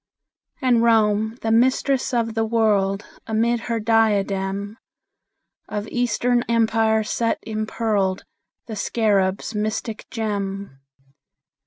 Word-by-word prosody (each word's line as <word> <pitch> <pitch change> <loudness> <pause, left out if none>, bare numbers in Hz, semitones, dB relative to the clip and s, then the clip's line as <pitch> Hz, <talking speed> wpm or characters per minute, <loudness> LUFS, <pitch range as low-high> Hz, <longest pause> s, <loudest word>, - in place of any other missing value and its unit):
And 245 -3 +4
Rome, 220 -1 +2
the 225 - 0
Mistress 260 +3 +2
of 230 -2 0
the 225 0 0
World, 210 -3 +1 0.2
Amid 230 +2 +1
her 230 0 -2
diadem 205 -2 +1 0.9
Of 210 +1 -4
Eastern 245 0 +1
Empires 220 -1 +2
set 230 -1 0
impearled 215 -3 -1 0.4
The 220 - -6
Scarab's 200 -1 0
mystic 215 +1 -3
gem. 200 - -4
220 Hz, 100 wpm, -22 LUFS, 205-230 Hz, 0.9 s, And